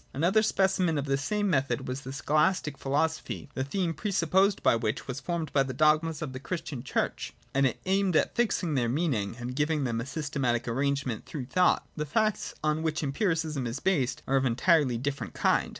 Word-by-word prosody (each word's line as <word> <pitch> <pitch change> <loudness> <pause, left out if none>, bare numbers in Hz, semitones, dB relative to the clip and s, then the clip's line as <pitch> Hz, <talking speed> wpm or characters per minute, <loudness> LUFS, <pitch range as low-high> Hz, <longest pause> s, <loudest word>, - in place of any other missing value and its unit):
Another 175 +9 +3
specimen 190 -6 +2
of 140 - -1
the 135 -1 +1
same 205 +10 -1
method 135 -8 0
was 130 +2 -4
the 130 - -7
Scholastic 150 +2 +1
philosophy, 150 +3 -2
the 130 - -2
theme 170 +4 -1
pre 160 +7 -4
supposed 190 +3 +2
by - - +5
which 115 -1 -2
was 130 0 -4
formed 170 +1 -3
by 140 - +4
the 130 -2 -2
dogmas 155 +2 +2
of 135 -4 -5
the 130 - -5
Christian 140 -3 -5
Church: - - -2 0.2
and 140 0 +4
it 125 - -4
aimed 190 -1 +2
at - - +2
fixing 205 -8 0
their 120 -4 +1
meaning 125 -8 0
and 125 +1 -5
giving 150 +1 +1
them 115 -3 -1
a 120 - -6
systematic 135 -5 -1
arrangement 135 -1 -1
through 140 -5 -5
thought. 180 +8 +2
— - - -37
The 150 0 -2
facts 215 +6 0
on 155 +1 +1
which 160 0 -1
Empiri 165 +7 +1
cism 155 -6 -2
is 115 - -4
based 145 -10 0
are 135 - +3
of 135 - +1
entirely 135 0 +3
different 135 +3 -4
kind. - - +2
145 Hz, 205 wpm, -28 LUFS, 130-170 Hz, 0.2 s, by